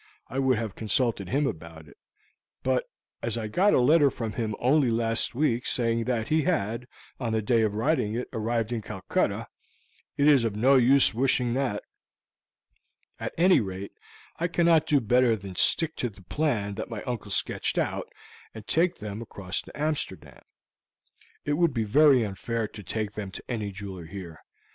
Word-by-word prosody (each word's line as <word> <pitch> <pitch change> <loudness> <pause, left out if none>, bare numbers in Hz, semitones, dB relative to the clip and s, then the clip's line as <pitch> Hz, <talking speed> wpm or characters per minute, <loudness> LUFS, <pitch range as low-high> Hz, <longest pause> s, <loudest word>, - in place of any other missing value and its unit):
I 130 - -3
would 130 -3 +2
have 110 -3 -3
consulted 110 -3 -1
him 145 +7 +1
about 80 - -6
it; 70 - -17 0.7
but 130 -1 0 0.3
as 115 0 -1
I 110 -2 -3
got 190 - +3
a - - +4
letter 145 +3 +5
from 115 -4 -4
him 110 -3 -2
only 135 +1 +3
last 115 0 0
week 130 -3 +1
saying 115 -1 0
that 115 -3 -1
he 155 +1 +3
had, 120 - -1 0.3
on 115 -4 -2
the 110 - +1
day 115 +2 +3
of 105 -2 0
writing 110 -2 0
it, 125 - -3
arrived 115 0 -1
in 120 -2 -2
Calcutta, 100 -3 -2 0.7
it 140 - +3
is 140 -5 +6
of 110 -3 -1
no 125 +6 +4
use 130 +1 +5
wishing 125 0 +1
that. 125 -6 -1 1.4
At - - -4
any 180 -1 +5
rate, 95 -1 -6 0.5
I 170 - 0
cannot 170 -2 +3
do 145 - +4
better 120 0 +3
than 100 -3 -9
stick 160 - +2
to 125 - -1
the 100 -2 -17
plan 110 -5 -1
that 110 - -5
my 110 -3 -5
uncle 120 -4 -4
sketched - - -1
out, - - -2 0.4
and 110 -2 -9
take 175 +6 +2
them 105 +1 -6
across 100 -4 -4
to - - -13
Amsterdam. 95 - -3 1.0
It 145 +2 0
would 170 -6 +2
be 115 - +1
very 135 +3 +5
unfair 110 +2 -3
to 105 - -10
take 105 +2 -3
them 105 -2 -6
to 95 - -9
any 110 -5 -3
jeweler 95 -3 -8
here. 90 -3 -9
115 Hz, 175 wpm, -27 LUFS, 105-135 Hz, 1.4 s, is